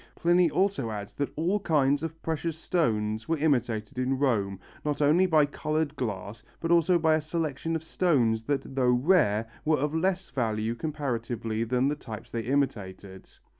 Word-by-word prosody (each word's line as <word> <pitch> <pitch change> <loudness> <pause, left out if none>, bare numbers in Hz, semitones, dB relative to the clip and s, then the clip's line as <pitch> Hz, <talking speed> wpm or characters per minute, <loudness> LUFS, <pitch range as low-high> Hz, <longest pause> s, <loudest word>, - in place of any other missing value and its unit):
Pliny 175 0 +3
also 185 - 0
adds 105 -2 -6
that 145 - -3
all 175 +7 +1
kinds 145 -6 +2
of 165 0 -5
precious 160 0 -2
stones 110 -10 -1
were 165 - +2
imitated 120 -7 0
in 130 +1 0
Rome, 105 -8 0 0.2
not 150 -1 -1
only 155 +6 +4
by 155 -4 +4
coloured 155 +1 -2
glass 105 -4 -4 0.2
but 165 - -2
also 170 +1 +4
by 160 -1 +3
a 155 - +2
selection 160 0 -2
of 160 - -3
stones 130 -11 +1
that, 135 0 -2
though 130 -2 +2
rare, 125 - +3 0.2
were 155 0 +2
of 150 +2 -1
less 185 +3 -1
value 110 -3 -1
comparatively 120 -5 -3
than 125 +3 +1
the 145 - 0
types 110 -7 -9
they 115 - -2
imitated. 105 -7 -3
140 Hz, 170 wpm, -28 LUFS, 115-160 Hz, 0.2 s, only